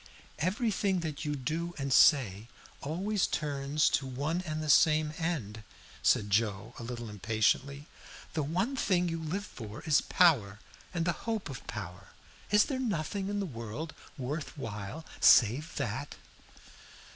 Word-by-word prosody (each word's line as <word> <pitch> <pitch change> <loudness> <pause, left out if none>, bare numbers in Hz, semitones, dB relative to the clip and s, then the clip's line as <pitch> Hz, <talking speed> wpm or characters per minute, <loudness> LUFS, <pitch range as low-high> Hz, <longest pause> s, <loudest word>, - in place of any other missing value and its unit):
"Everything 195 - 0
that 155 -2 -4
you 150 0 -1
do 165 +6 -3
and 140 -2 -1
say 110 -9 +5 0.3
always 190 +7 0
turns 145 0 0
to 135 - 0
one 145 +7 -2
and 155 0 -3
the - - -4
same 155 +2 +4
end," 130 -11 -2 0.4
said 105 -1 +2
Joe, 105 +1 0
a - - -6
little 120 0 -5
impatiently. 110 +7 0 0.5
"The 160 - 0
one 185 - -1
thing 180 -8 +2
you 165 0 -3
live 185 +6 -3
for 110 - -9
is 155 -4 +3
power 120 - +3 0.3
and 170 -2 -1
the 175 - +3 0.2
hope 220 -9 -2
of 130 - -9
power. 90 -5 -7 0.4
Is 210 0 +5
there 270 -3 -3
nothing 195 -4 -2
in 205 0 -1
the 200 - -1
world 115 - -6 0.2
worth 145 +4 -4
while 110 +5 -6
save 125 +7 +5
that?" - - -3
150 Hz, 145 wpm, -31 LUFS, 115-175 Hz, 0.5 s, say